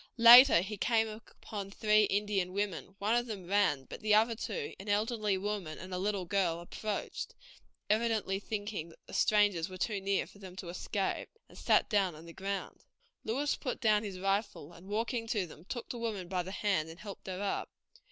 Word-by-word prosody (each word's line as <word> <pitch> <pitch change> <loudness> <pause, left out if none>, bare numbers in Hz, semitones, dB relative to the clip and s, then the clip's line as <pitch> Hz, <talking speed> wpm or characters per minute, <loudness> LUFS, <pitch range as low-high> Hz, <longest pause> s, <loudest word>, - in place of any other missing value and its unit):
Later 235 -4 +10
he 205 +3 -5
came 225 +1 +2
upon 215 -2 -8
three 210 +1 +3
Indian 200 -3 0
women; 195 -1 -3
one 210 +2 0
of 240 0 +1
them 200 -5 -6
ran, 180 -8 +2
but - - -9
the 215 -1 +4
other 225 +2 +4
two, 440 - -4
an 200 +2 -8
elderly 210 -1 +1
woman 195 -5 -3
and 185 +1 -8
a 180 - -2
little 195 -1 -1
girl, 175 -3 +1
approached, 205 +4 -5 0.5
evidently 215 -3 +1
thinking 205 -5 -4
that 165 - -19
the - - -13
strangers 205 -5 +3
were 185 - -8
too 200 +1 -1
near 195 0 +1
for 200 - -17
them 185 -2 -10
to 185 -2 -7
escape, 190 +2 -2 0.2
and - - -17
sat - - +3
down 195 -6 +1
on 160 +2 -12
the 165 - -10
ground. 195 +1 -4 0.4
Lewis 275 +6 0
put 255 - -4
down 215 -4 +3
his 200 -3 -5
rifle 195 -5 -1
and 170 +3 -14
walking 230 +3 -2
to 210 -5 0
them, 160 0 -14
took 240 +3 -6
the 240 - -5
woman 215 -6 -3
by 180 0 -1
the 180 - -7
hand, 190 -6 0
and 165 +2 -11
helped 200 -2 -9
her 185 -1 -4
up. 200 -1 -2
205 Hz, 200 wpm, -32 LUFS, 185-215 Hz, 0.5 s, Later